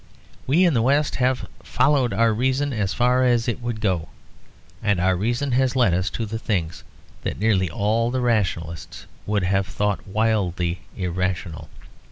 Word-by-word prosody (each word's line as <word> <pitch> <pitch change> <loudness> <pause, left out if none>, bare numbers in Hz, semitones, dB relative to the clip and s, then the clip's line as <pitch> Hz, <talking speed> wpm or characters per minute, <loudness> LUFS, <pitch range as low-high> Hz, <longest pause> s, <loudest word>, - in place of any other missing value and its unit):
We 165 +8 +4
in 170 - +3
the 115 - +2
West 140 +5 +2
have 130 0 0
"followed 130 -1 +2
our 115 -1 +2
reason 130 +5 0
as 100 -4 -1
far 125 +3 +2
as 120 -2 +2
it 120 - -2
would 120 -2 -3
go," 90 -8 -1 0.7
and 100 -3 +1
our 95 +1 +2
reason 120 +8 -1
has 130 +1 +2
led 120 -8 +3
us 95 +2 0
to 115 - -2
things 100 -6 -3 0.4
that - - -3
nearly 100 -4 +2
all 110 +7 0
the 130 +1 -1
rationalists 90 - -2 0.2
would 105 -2 0
have 95 +1 +1
thought 105 -1 -2
wildly 95 -5 0 0.2
irrational. 90 -2 -3
110 Hz, 160 wpm, -23 LUFS, 95-125 Hz, 0.7 s, We